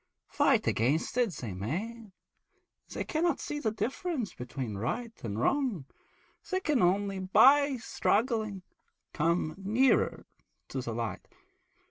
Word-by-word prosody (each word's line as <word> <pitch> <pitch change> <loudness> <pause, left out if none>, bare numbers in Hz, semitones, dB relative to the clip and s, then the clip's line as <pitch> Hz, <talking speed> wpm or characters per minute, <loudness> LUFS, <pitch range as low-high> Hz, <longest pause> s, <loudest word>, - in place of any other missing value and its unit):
Fight - - +3
against 140 - +1
it 245 -1 +3
as 175 - -8
they 110 -6 -5
may, 195 - -4 0.8
they - - -3
cannot 325 -1 0
see 295 - -4
the 230 - 0
difference 250 - -3
between 125 -2 -5
right 230 - -2
and 105 -2 -3
wrong; 245 - 0 0.6
they 375 - +1
can 300 -8 +1
only, 195 +2 +2
by 265 +9 +5
struggling, 220 -3 0 0.5
come 165 0 +1
nearer 225 +7 +2 0.4
to - - -3
the - - -4
light. - - -4
215 Hz, 125 wpm, -30 LUFS, 165-260 Hz, 0.8 s, by